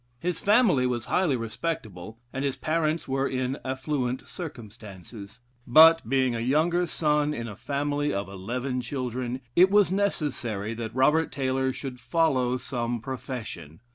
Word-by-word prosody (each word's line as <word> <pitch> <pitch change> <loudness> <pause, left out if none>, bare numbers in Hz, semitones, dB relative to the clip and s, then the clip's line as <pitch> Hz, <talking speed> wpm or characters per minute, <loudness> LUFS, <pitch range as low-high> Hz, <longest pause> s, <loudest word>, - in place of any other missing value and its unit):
His 175 +5 -2
family 200 - +4
was 120 -2 -2
highly 175 -7 +1
respectable, 110 - -5 0.2
and 135 - -3
his 140 -2 -1
parents 160 0 -1
were 135 +1 0
in 130 +1 -2
affluent 130 -1 -2
circumstances; 110 - -9 0.3
but, 160 0 +7
being 130 -2 +2
a 115 - -2
younger 160 +8 +2
son 150 -2 +1
in 115 0 -4
a 105 - -7
family 145 +4 -1
of 100 -1 -2
eleven 125 +7 -3
children, 125 0 -4
it 185 +2 +7
was 205 -2 +4
necessary 125 - -1
that 115 0 -6
Robert 150 +5 +3
Taylor 130 -1 0
should 130 -1 -7
follow 130 -1 +1
some 120 -2 -3
profession. 115 - -7
130 Hz, 140 wpm, -26 LUFS, 120-150 Hz, 0.3 s, but